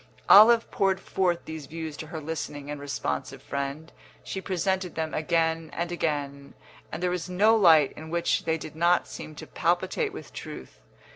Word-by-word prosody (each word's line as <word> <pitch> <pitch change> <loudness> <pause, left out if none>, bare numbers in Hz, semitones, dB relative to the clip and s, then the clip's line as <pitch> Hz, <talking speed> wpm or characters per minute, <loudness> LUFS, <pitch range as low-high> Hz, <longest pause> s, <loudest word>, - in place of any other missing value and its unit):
Olive 225 +3 +8
poured 195 -1 +1
forth 180 -3 -1
these 160 -3 -7
views 160 -1 -6
to 155 - -7
her 160 +1 -6
listening 145 -2 -5
and 145 -1 -6
responsive 145 -1 -3
friend; 140 +4 -5 0.3
she 190 - -5
presented 190 -1 -1
them 160 -1 -3
again 160 0 0
and 170 +1 -3
again, 145 -4 -3 0.4
and 160 +3 -5
there 180 - +1
was 180 0 -3
no 210 +5 +4
light 160 -9 +6
in 160 +1 -9
which 170 +1 0
they 160 0 +1
did 155 -1 -9
not 170 +2 +3
seem 155 - -9
to - - -9
palpitate 180 - 0
with - - -10
truth. - - -9
165 Hz, 170 wpm, -27 LUFS, 155-180 Hz, 0.4 s, Olive